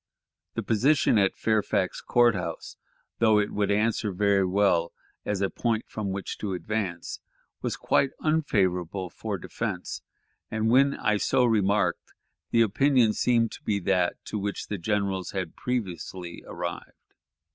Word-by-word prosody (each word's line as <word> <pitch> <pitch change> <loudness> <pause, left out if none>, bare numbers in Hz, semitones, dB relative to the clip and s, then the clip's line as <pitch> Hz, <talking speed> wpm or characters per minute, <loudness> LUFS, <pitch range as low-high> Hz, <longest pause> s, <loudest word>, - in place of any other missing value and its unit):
The - - -2
position 120 +1 +3
at 95 -1 +2
Fairfax 105 -3 0
Court 120 -1 +4
House, 90 -3 -5 0.4
though 110 -2 +5
it 105 0 +1
would 105 -1 0
answer 105 0 +1
very 100 +1 +2
well 90 -3 +2 0.3
as 100 -2 -1
a 95 - +1
point 115 -2 -1
from 105 -2 -4
which 95 0 -4
to 100 -3 -3
advance, 90 -1 -3 0.4
was - - -2
quite 140 - +2
unfavorable 95 - 0
for - - -4
defense; - - -4 0.5
and 110 0 0
when 140 +3 +5
I 105 0 +1
so 125 +4 +2
remarked, 105 -3 +1 0.4
the 115 0 +4
opinion 120 +1 +3
seemed 115 -1 +2
to - - -11
be 105 - 0
that 90 -1 +1
to 105 - -3
which 100 0 -4
the 105 - -3
generals 100 -1 -1
had 95 -4 -4
previously 90 -7 -4
arrived. 85 0 -6
105 Hz, 145 wpm, -27 LUFS, 95-115 Hz, 0.5 s, though